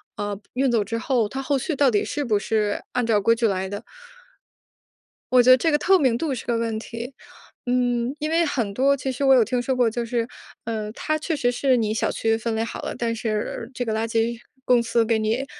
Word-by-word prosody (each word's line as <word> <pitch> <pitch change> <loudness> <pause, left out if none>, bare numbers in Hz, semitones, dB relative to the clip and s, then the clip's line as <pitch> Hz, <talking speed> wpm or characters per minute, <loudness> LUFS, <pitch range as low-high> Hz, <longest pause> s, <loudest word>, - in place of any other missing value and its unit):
啊， 205 0 -3 0.2
运 260 0 +1
走 225 -3 +2
之 230 - -3
后， 230 -2 +1
它 265 +4 -5
后 280 0 +1
续 315 - -2
到 275 -2 +3
底 205 - +1
是 290 0 -3
不 215 -5 +1
是 210 0 -1
按 250 -2 0
照 220 -3 +3
规 230 +3 +3
矩 230 0 0
来 190 0 -2
的？ 205 +1 -6 1.5
我 250 -1 +6
觉 255 - +4
得 255 - +8
这 325 +4 +1
个 295 - +4
透 380 +5 +4
明 255 -5 +2
度 295 0 -2
是 240 - -6
个 235 -1 0
问 230 -1 -1
题。 235 +3 -7 0.5
嗯， 245 +1 0
因 305 +1 -3
为 335 +1 +3
很 235 -10 -1
多 275 +5 +3
其 265 0 -3
实 260 +2 -4
我 270 -1 +6
有 245 - +6
听 245 +2 -1
说 260 +1 -1
过 245 -2 +3
就 235 +2 -3
是， 230 0 -1 0.4
嗯， 215 -2 -4
它 310 +4 -2
确 320 +1 -2
实 245 -4 +1
是 260 0 +2
你 215 -2 0
小 - - 0
区 225 0 +1
分 225 0 -2
类 225 - 0
好 230 - -6
了， - - -5
但 230 -1 -1
是 220 +1 -3
这 245 - -2
个 220 - -1
垃 220 +1 -1
圾 230 +1 0 0.3
公 245 -1 +4
司 230 0 +1
给 225 -1 +1
你 225 +5 0
235 Hz, 260 characters per minute, -23 LUFS, 225-260 Hz, 1.5 s, 得